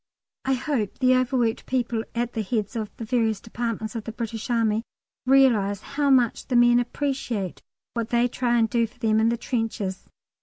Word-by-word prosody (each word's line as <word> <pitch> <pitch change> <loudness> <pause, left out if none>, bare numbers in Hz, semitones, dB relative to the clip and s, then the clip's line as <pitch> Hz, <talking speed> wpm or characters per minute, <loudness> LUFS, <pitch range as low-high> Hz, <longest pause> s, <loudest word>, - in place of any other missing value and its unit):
I 270 - +2
hope 250 -6 -2
the 255 -1 +4
overworked 250 -3 0
people 240 -3 0
at 240 +1 -1
the 225 - -1
heads 215 +1 -2
of 215 -2 -3
the 230 - -5
various 220 -3 +1
departments 225 0 -4
of 225 - -4
the 225 - -4
British 225 0 -5
Army 225 -2 +2 0.5
realise 235 -7 +4
how 285 0 +1 0.4
the 250 - -1
men 240 0 +6
appreciate 245 - -2 0.3
what 230 -1 -2
they 240 0 +3
try 240 -1 0
and 225 -1 +3
do 230 +1 +1
for 220 - -25
them 220 -2 +2
in 225 +1 +3
the 235 - 0
trenches. 225 -6 -3
235 Hz, 180 wpm, -25 LUFS, 220-245 Hz, 0.5 s, men